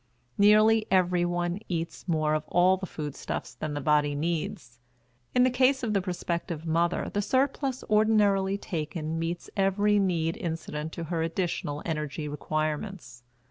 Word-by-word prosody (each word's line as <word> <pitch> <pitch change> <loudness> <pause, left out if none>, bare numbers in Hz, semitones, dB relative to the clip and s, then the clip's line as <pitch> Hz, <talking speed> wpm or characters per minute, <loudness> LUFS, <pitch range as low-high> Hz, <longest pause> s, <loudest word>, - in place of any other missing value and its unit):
Nearly 215 +2 +5
everyone 175 -1 +1
eats 170 0 -4
more 155 -3 +1
of 155 0 0
all 180 +2 +4
the 190 0 -6
food 150 -4 -5
stuffs - - -5
than 150 -1 -4
the - - -2
body 145 0 +2
needs. 145 -6 -3 0.6
In 250 - +6
the 255 - +4
case 260 +1 +3
of 220 -3 0
the 200 - +2
prospective 170 -2 -3
mother 170 +2 0
the 205 - +1
surplus 265 +3 0
ordinarily 205 -2 +3
taken 160 -2 -4
meets 170 +1 -4
every 205 +1 +3
need 170 -4 0
incident 160 -2 -4
to 170 - -5
her 165 0 -2
additional 165 -3 -2
energy 150 -2 -3
requirements. 155 - -3
175 Hz, 145 wpm, -28 LUFS, 155-200 Hz, 0.6 s, In